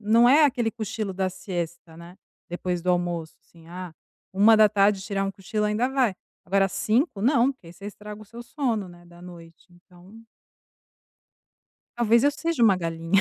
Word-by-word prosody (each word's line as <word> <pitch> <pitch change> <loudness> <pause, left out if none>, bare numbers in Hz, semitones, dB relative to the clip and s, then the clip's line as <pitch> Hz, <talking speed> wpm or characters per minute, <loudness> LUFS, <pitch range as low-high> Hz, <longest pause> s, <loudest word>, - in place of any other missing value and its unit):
não 225 +3 +4
é 295 +4 +6
aquele 240 -5 +1
cochilo 220 -2 -4
da 190 0 -1
siesta 175 -3 -6
né, 170 +2 -13 0.3
depois 175 0 -3
do 180 - +1
almoço, 175 -2 -2
assim, 165 -1 -20
ah, 180 -1 -8 0.4
13h 205 -1 +5
tirar 195 0 -2
um 195 - -2
cochilo 205 +2 -3
ainda 210 +4 0
vai. 260 -6 +1 0.3
Agora 195 +1 +2
17h, 220 - 0
não! 255 +3 +3
Porque, 260 -10 -22
aí, 165 - -11
você 200 - -14
estraga 210 +1 -9
o - - -13
seu 235 +3 -11
sono, 235 -7 -2
né, 175 0 -16
da 175 0 -17
noite. 170 -2 -14
Então 180 +4 -18 1.8
Talvez 235 +1 +3
eu 290 - +5
seja 320 -3 -2
uma 205 -4 +5
galinha. 165 +2 0
195 Hz, 170 wpm, -25 LUFS, 175-225 Hz, 1.8 s, é